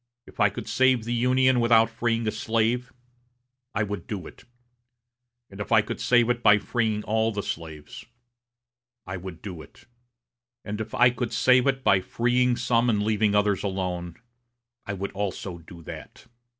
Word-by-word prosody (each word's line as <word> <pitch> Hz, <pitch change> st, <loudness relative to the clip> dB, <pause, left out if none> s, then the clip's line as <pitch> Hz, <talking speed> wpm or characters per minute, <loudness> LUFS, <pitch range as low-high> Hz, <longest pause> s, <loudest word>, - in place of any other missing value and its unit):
If -, -, -17 dB
I -, -, +5 dB
could -, -, -8 dB
save 130 Hz, -3 st, +3 dB
the 120 Hz, +2 st, -3 dB
Union 130 Hz, +1 st, +3 dB
without 115 Hz, -1 st, +5 dB
freeing 115 Hz, 0 st, -1 dB
any 110 Hz, -2 st, -1 dB
slave, 115 Hz, +4 st, -1 dB, 0.8 s
I 105 Hz, -, +1 dB
would 105 Hz, -4 st, -5 dB
do 95 Hz, -6 st, -5 dB
it; -, -, -13 dB, 1.0 s
and 100 Hz, -2 st, -13 dB
if 105 Hz, +1 st, -6 dB
I 110 Hz, -2 st, +5 dB
could -, -, -6 dB
save 120 Hz, -2 st, +4 dB
it 120 Hz, -1 st, 0 dB
by 105 Hz, -3 st, +6 dB
freeing 110 Hz, -1 st, -1 dB
all 110 Hz, +1 st, +1 dB
the 105 Hz, -2 st, -4 dB
slaves, 80 Hz, -2 st, -7 dB, 1.0 s
I 95 Hz, +1 st, -5 dB
would 90 Hz, -2 st, -9 dB
do 90 Hz, -6 st, -7 dB
it; -, -, -17 dB, 0.8 s
and 105 Hz, +1 st, -4 dB
if 110 Hz, -, -6 dB
I 125 Hz, 0 st, +5 dB
could 125 Hz, -1 st, -4 dB
save 125 Hz, +2 st, +4 dB
it 135 Hz, -1 st, 0 dB
by 95 Hz, -, +4 dB
freeing 125 Hz, +4 st, +1 dB
some 120 Hz, 0 st, +1 dB
and 105 Hz, -3 st, +1 dB
leaving 105 Hz, -1 st, +1 dB
others 105 Hz, -1 st, +2 dB
alone, 90 Hz, -3 st, -3 dB, 0.7 s
I 100 Hz, -, -2 dB
would 100 Hz, 0 st, -4 dB
also 95 Hz, -3 st, -4 dB
do 85 Hz, 0 st, -13 dB
that. -, -, -10 dB
110 Hz, 170 wpm, -25 LUFS, 100-120 Hz, 1.0 s, by